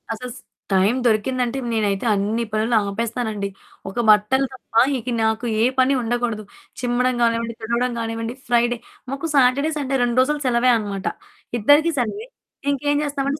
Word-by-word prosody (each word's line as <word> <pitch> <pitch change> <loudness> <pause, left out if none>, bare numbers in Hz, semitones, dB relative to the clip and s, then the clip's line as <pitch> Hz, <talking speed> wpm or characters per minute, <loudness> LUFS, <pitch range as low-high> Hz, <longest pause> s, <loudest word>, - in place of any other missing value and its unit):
అసస్ 245 +3 -7 0.4
time 195 +5 +3
దొరికిందంటే 245 +3 +1
నేనైతే 210 -2 0
అన్ని 210 +4 0
పనులు 215 +2 0
ఆపేస్తానండి. 220 0 -2 0.4
ఒక 195 - -11
బట్టలు 215 +6 +4
తప్ప 255 -3 -16 0.2
ఇక 250 0 -6
నాకు 220 +2 0 0.2
ఏ - - +4 0.2
పని 260 +2 +4
ఉండకూడదు. 235 -2 -2 0.4
చిమ్మడం 250 0 +1
గానివ్వండి, 230 0 +1
తుడవడం 235 +3 0
గానివ్వండి, 225 0 -3
ఫ్రైడే 240 0 +2 0.3
మాకు 280 +4 -3
సాటర్డే, 275 +3 +4
సండే 275 -2 -1
2 240 +1 +1
రోజులు 295 +3 0
సెలవే 250 0 +3
అనమాట. 200 -3 -5 0.5
ఇద్దరికీ 290 +9 +5
సెలవే. 400 - -2 0.4
ఇంకేం 290 +1 0
చేస్తామంటే, 285 0 -2
240 Hz, 140 wpm, -21 LUFS, 220-260 Hz, 0.5 s, ఇద్దరికీ